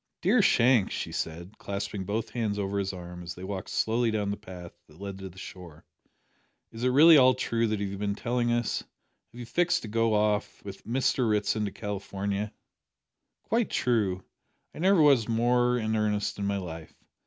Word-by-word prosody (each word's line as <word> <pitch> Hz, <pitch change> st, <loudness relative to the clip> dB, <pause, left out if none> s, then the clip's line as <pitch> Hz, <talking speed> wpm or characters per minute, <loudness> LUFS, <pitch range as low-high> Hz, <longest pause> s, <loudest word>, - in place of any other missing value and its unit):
"Dear 215 Hz, +6 st, +4 dB
Shank," 120 Hz, -, +4 dB
she -, -, -4 dB
said, 85 Hz, +6 st, -5 dB
clasping 100 Hz, -1 st, -4 dB
both 110 Hz, +3 st, -3 dB
hands 110 Hz, -4 st, -2 dB
over 100 Hz, 0 st, -2 dB
his 95 Hz, -1 st, -1 dB
arm 90 Hz, -1 st, -9 dB
as 85 Hz, 0 st, -7 dB
they 90 Hz, -, -10 dB
walked 95 Hz, -1 st, -5 dB
slowly 115 Hz, +1 st, +1 dB
down 105 Hz, -2 st, -1 dB
the -, -, -2 dB
path 90 Hz, -3 st, -10 dB
that 75 Hz, +2 st, -19 dB
led 100 Hz, -1 st, -6 dB
to 95 Hz, 0 st, -7 dB
the 90 Hz, -, -17 dB
shore, 85 Hz, -5 st, -11 dB, 0.9 s
"is 115 Hz, +1 st, -7 dB
it 125 Hz, -, +3 dB
really 155 Hz, +5 st, +8 dB
all 130 Hz, -2 st, +6 dB
true 115 Hz, -2 st, 0 dB
that 110 Hz, -1 st, -1 dB
you 100 Hz, -1 st, -3 dB
have 100 Hz, -, -6 dB
been 100 Hz, -1 st, -1 dB
telling 120 Hz, +1 st, -1 dB
us? 120 Hz, -1 st, 0 dB, 0.5 s
Have 120 Hz, -, -12 dB
you 120 Hz, -, -6 dB
fixed 175 Hz, +9 st, +1 dB
to -, -, -6 dB
go 115 Hz, 0 st, +1 dB
off 105 Hz, -1 st, 0 dB
with 100 Hz, -1 st, -9 dB
with -, -, -20 dB
Mr 125 Hz, -1 st, +1 dB
Ritson 105 Hz, 0 st, +1 dB
to 100 Hz, -, -3 dB
California?" 100 Hz, 0 st, -4 dB, 0.9 s
"Quite 230 Hz, 0 st, 0 dB
true; 100 Hz, -7 st, 0 dB, 0.5 s
I -, -, -10 dB
never 185 Hz, -1 st, +4 dB
was 135 Hz, -7 st, +4 dB
more 120 Hz, +2 st, +2 dB
in 110 Hz, -1 st, -1 dB
earnest 105 Hz, -1 st, -1 dB
in 100 Hz, -, -1 dB
my 100 Hz, 0 st, 0 dB
life. 85 Hz, -4 st, -8 dB
105 Hz, 195 wpm, -28 LUFS, 100-120 Hz, 0.9 s, really